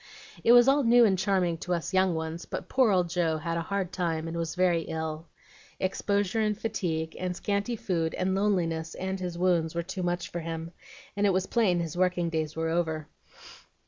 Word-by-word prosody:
"It 230 - +5
was 245 +1 +7
all 280 +1 +4
new 240 0 +6
and 195 -3 +3
charming 185 -3 +1
to 180 +1 -1
us 170 +2 -4
young 185 -2 +3
ones, 160 +1 -4
but - - -6
poor 255 -3 +3
old 180 -3 +3
Joe 170 -2 0
had 165 +2 -3
a 170 - -1
hard 190 +1 -2
time, 165 -3 -2
and 165 - -5
was 165 -1 -3
very 180 -2 +2
ill. 160 0 -4 0.5
Exposure 200 +2 0
and 210 -1 0
fatigue, 160 -8 -2
and 180 -1 -2
scanty 200 +5 -1
food, 170 -6 -1
and 185 +1 0
loneliness, 175 -5 0
and 190 +1 -3
his 180 -2 -4
wounds, 175 -3 +1
were 170 - -1
too 185 +2 -5
much 175 0 -2
for 175 - -3
him, 165 0 -5 0.4
and 205 0 +2
it 195 - +3
was 185 +1 +1
plain 195 -6 +2
his 165 -1 -4
working 180 -2 +1
days 155 -1 -2
were 160 0 -1
over. 160 -2 -1
175 Hz, 205 wpm, -28 LUFS, 165-195 Hz, 0.5 s, was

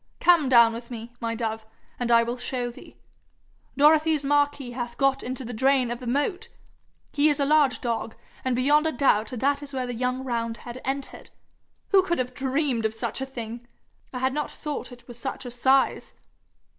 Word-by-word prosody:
Come 335 -6 +4
down 235 -2 +6
with 235 +1 -8
me, 235 0 -8
my 230 0 -2
dove, 225 -1 -3 0.4
and 240 -1 -1
I 230 0 +6
will 240 +2 -4
show 245 -1 -2
thee. - - -15 0.8
Dorothy's 305 0 +4
Marquis 290 -2 +1
hath 240 -1 -5
got 275 -1 +2
into 255 +1 -5
the 245 - -6
drain 260 +1 +2
of 240 - -4
the 250 - -8
moat! 290 - -1 0.6
He 295 +1 +4
is 290 - +1
a 280 - +2
large 290 -4 +3
dog, 230 -2 -3 0.3
and 260 -1 0
beyond 295 +5 +3
a - - +1
doubt 225 -8 +2
that 275 +5 0
is 285 -1 -9
where 255 -1 -1
the 245 - -4
young 250 +2 -2
roundhead 235 0 -4
entered. 270 +1 -5 0.6
Who 390 -1 +6
could 345 -2 -1
have 255 0 -2
dreamed 265 -3 0
of 220 - -9
such 235 +3 -3
a 265 - -3
thing! 235 -2 -7 0.4
I 255 - -5
had 260 +1 0
no 300 0 -1
thought 300 -3 -6
it 245 -1 -14
was 240 -1 -10
such 265 - -5
a 245 - -5
size.' 265 +3 +1
255 Hz, 195 wpm, -25 LUFS, 235-280 Hz, 0.8 s, down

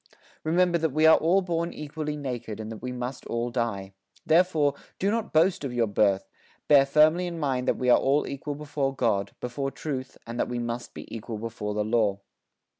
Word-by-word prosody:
Remember 170 +2 +2
that 160 0 +1
we 155 +3 +2
are 160 - +8
all 185 +4 +3
born 170 -1 -1
equally 150 0 -5
naked 120 -6 -5
and 110 0 -6
that 110 - -8
we 125 +1 -4
must 125 +1 -5
all 120 +1 -2
die. 100 -5 -2 0.3
Therefore, 160 -4 +3 0.2
do 195 +2 +1
not 225 0 -2
boast 170 +3 +3
of 135 - -3
your 120 -1 +3
birth; 100 -2 +1 0.4
bear 140 -2 +6
firmly 155 +5 +4
in 170 -1 -5
mind 130 -4 -1
that - - +2
we 125 - -2
are - - +6
all 140 +2 +2
equal 140 +1 -5
before 145 -2 -2
God, 110 -6 0
before 135 +3 -3
Truth 135 -2 -5
and 115 +1 -6
that - - 0
we 125 - -3
must 120 0 -4
be - - -7
equal 110 0 -6
before 105 -2 -4
the 105 0 0
Law. 105 -3 +1
135 Hz, 200 wpm, -27 LUFS, 115-155 Hz, 0.4 s, are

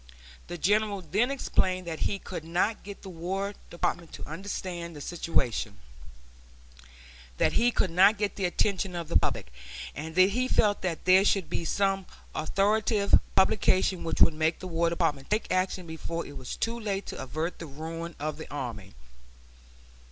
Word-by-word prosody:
The 175 - -5
General 205 +3 +2
then 205 - +1
explained 185 -9 0
that 165 -2 -4
he 200 - 0
could 185 -4 -7
not 175 +7 0
get 200 0 -9
the 195 - -7
War 190 +4 -3 0.2
Department 170 -1 -2
to - - -7
understand 170 0 -5
the - - -8
situation; 125 -10 -1 1.6
that - - +3
he 240 +1 +4
could 190 -6 +1
not 195 +5 +6
get 205 -1 -1
the 195 - -1
attention 190 +1 0
of 170 -2 -4
the - - -4
public; - - +1 0.4
and 160 +2 -6
that 185 +2 +6
he 250 +4 +1
felt 205 -5 +3
that 175 -3 -3
there 185 +1 +7
should 190 -5 +1
be 170 - -2
some 195 +1 +1 0.3
authoritative 205 +5 +1 0.2
publication 190 -1 +3
which 165 - -2
would - - +7
make 160 +1 +1
the - - -9
War 170 -1 +1
Department 165 -5 -1
take 215 +1 0
action 185 0 0
before 165 +1 -4
it 145 - -10
was 130 - -5
too 230 +1 -2
late 200 -3 -2
to - - -6
avert 155 +6 -3
the 165 - -6
ruin 165 +3 -6
of 150 0 -3
the 160 - -8
army. 130 - -5
180 Hz, 170 wpm, -28 LUFS, 160-200 Hz, 1.6 s, there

